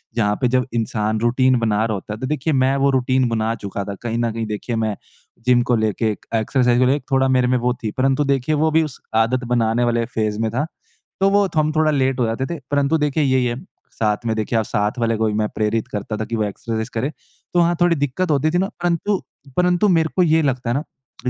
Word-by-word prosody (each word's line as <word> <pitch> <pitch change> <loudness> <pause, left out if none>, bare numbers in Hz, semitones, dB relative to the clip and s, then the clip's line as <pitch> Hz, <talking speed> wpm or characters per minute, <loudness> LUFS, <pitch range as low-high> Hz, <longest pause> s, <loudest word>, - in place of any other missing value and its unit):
जहाँ 105 -3 +1
पे 125 - +3
जब 125 0 +1
इंसान 110 -1 -1
रूटीन 125 +2 +3
बना 110 -2 +1
रहा 110 - -1
होता 100 +1 -5
है 105 - -8
तो 130 - -3
देखिए 150 +2 -1
मैं 130 0 +2
वो 140 0 +3
रूटीन 130 -1 +2
बना 110 -1 0
चुका 100 -1 -5
था। 100 0 -6
कहीं 115 -1 -2
न 120 -1 0
कहीं 115 0 -3
देखिए 105 +3 -4
मैं 110 -2 -1 0.5
जिम 125 -1 +4
को 120 - +4
लेके 110 0 0
एक - - -9
एक्सरसाइज़ 120 +2 +2
को 130 - +4
लेके 140 +3 +2
थोड़ा 135 0 +3
मेरे 130 -1 +3
में 125 0 +2
वो 125 0 0
थी 110 - -1
परंतु 135 +2 +2
देखिए 140 +2 +1
वो 155 +2 +2
भी 160 +1 +4
उस 150 -5 -7 0.2
आदत 115 +3 +2
बनाने 115 0 +2
वाले 120 -1 +1
फ़ेज़ 110 -3 -2
में 110 0 0
था। 130 +6 -1 0.6
तो 195 - +5
वो 200 0 +3
थ - - -2
हम 155 0 +3
थोड़ा 155 0 +3
लेट 135 -2 +1
हो 120 - +3
जाते 115 +4 -2
थे 165 +3 -5
परंतु 145 +2 +2
देखिए 150 0 +1
यही 130 -2 +2
है, 120 -1 -1 0.4
साथ 105 +1 -1
में 110 -1 0
देखिए 110 +2 -1
आप 110 - -1
साथ 105 +5 -1
वाले 115 -1 +1
को 110 - +1
भी 105 - -1
मैं 105 0 0
प्रेरित 110 +1 0
करता 105 +1 -4
था 110 - -3
कि 115 - -4
वो 110 - 0
एक्सरसाइज़ 110 +2 -4
करे, 120 +5 -1 0.4
तो 175 - +3
वहाँ 170 0 +3
थोड़ी 175 -1 +4
दिक्कत 145 +4 -1
होती 150 +2 +2
थी 175 - +1
ना। 190 +2 0
परंतु 175 +3 0 0.4
परंतु 180 +2 +3
मेरे 165 -3 +3
को 185 - +4
ये 160 -1 +3
लगता 130 -5 -1
है - - +1
ना 145 - -1 0.4
कि, - - +2
125 Hz, 255 wpm, -20 LUFS, 110-145 Hz, 0.6 s, तो